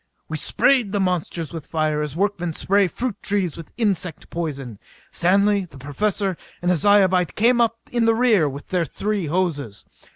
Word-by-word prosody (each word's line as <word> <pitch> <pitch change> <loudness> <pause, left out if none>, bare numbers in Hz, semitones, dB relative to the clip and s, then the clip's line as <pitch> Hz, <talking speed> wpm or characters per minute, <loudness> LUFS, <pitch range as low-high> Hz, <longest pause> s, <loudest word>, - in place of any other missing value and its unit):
We - - -3
sprayed 245 -7 +2
the 205 - +1
monsters 175 -4 -1
with 165 -3 -7
fire 155 -2 0
as 150 -1 -4
workmen 180 -3 -1
spray 195 +4 +2
fruit 235 +5 -4
trees 195 -5 -1
with 165 - -10
insect 195 -7 -2
poison. 140 -10 -4 0.3
Stanley, 200 +2 +3
the 165 -5 -15
Professor 190 +7 -1 0.2
and 175 +1 +1
a - - +3
Zyobite 190 -1 +3
came 240 +2 +4
up 230 0 +2
in 240 -2 +1
the 225 0 +4
rear 220 -10 +3
with 140 +1 -9
their 180 -2 +1
three 200 +3 -2
hoses. 145 - -2
185 Hz, 170 wpm, -22 LUFS, 160-205 Hz, 0.3 s, came